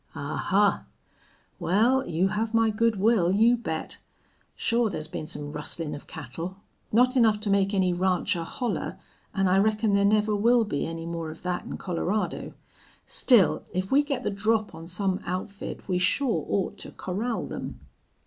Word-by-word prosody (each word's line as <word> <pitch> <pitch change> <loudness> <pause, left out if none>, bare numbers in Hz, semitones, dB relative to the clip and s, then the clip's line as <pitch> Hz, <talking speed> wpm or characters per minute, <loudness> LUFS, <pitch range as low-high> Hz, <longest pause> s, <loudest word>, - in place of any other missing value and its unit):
"Ahuh! 190 +7 +1 0.8
Wal, 240 +8 +2
you 175 +4 +1
have 220 +2 -1
my 225 -1 +4
good 230 +1 +2
will, 195 -3 +3
you 225 +5 +5
bet.... 160 -10 -4 0.6
Sure 230 -1 +1
thar's 160 -5 -4
been 155 -1 -6
some 145 -3 -4
rustlin' 150 +1 -2
of 145 - -9
cattle. 165 +9 -7 0.3
Not 250 +4 +4
enough 220 -4 +4
to 210 -2 -1
make 195 0 +3
any 190 -3 +2
rancher 180 0 0
holler, 235 +8 -3 0.4
an' 195 -1 +2
I 185 +1 +4
reckon 215 +1 +2
there 200 0 +4
never 210 +1 +3
will 235 +3 +4
be 145 -10 -2
any 165 0 -5
more 165 -1 -4
of 155 - -8
thet 180 0 -3
in - - -6
Colorado. 190 +3 -2 0.5
Still, 235 -8 +4
if 185 +1 -2
we 280 +2 +6
get 280 -3 -3
the - - -1
drop 215 +2 0
on 165 +1 -9
some 185 +1 -1
outfit 185 +3 -5
we 180 -2 +1
sure 225 +7 +1
ought 195 - -1
to - - -7
corral 220 +6 -3
them." - - -6
200 Hz, 170 wpm, -26 LUFS, 175-225 Hz, 0.8 s, we